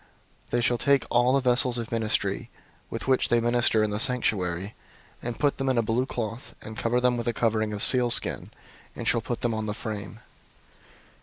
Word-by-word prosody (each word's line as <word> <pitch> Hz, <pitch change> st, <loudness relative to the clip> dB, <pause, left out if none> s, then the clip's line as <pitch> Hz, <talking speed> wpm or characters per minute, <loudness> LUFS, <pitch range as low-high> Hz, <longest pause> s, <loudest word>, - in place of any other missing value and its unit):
004:012 -, -, -33 dB
They 120 Hz, -, 0 dB
shall 120 Hz, 0 st, +1 dB
take 140 Hz, -1 st, +2 dB
all 120 Hz, +1 st, +3 dB
the 135 Hz, -2 st, +1 dB
vessels 125 Hz, 0 st, +3 dB
of 115 Hz, -1 st, -5 dB
ministry, 110 Hz, 0 st, -1 dB, 0.4 s
with 115 Hz, -, -6 dB
which 130 Hz, -1 st, +2 dB
they 120 Hz, -, +3 dB
minister 120 Hz, -2 st, +2 dB
in 105 Hz, -, -1 dB
the 105 Hz, -, -2 dB
sanctuary, 100 Hz, -7 st, +1 dB, 0.5 s
and 120 Hz, -1 st, -5 dB
put 145 Hz, -1 st, 0 dB
them 135 Hz, 0 st, 0 dB
in 130 Hz, -, +1 dB
a 115 Hz, -, +3 dB
blue 115 Hz, +4 st, 0 dB
cloth, 115 Hz, -1 st, -5 dB
and 110 Hz, -, -9 dB
cover 115 Hz, +2 st, 0 dB
them 125 Hz, -1 st, +2 dB
with 120 Hz, -, -4 dB
a 120 Hz, -, +1 dB
covering 110 Hz, -2 st, 0 dB
of 105 Hz, -1 st, +1 dB
sealskin, 120 Hz, -2 st, +2 dB, 0.5 s
and -, -, -5 dB
shall -, -, +2 dB
put -, -, -5 dB
them 120 Hz, -, 0 dB
on 110 Hz, 0 st, -3 dB
the 105 Hz, -, -3 dB
frame. 105 Hz, -2 st, -7 dB
120 Hz, 205 wpm, -26 LUFS, 110-125 Hz, 0.5 s, all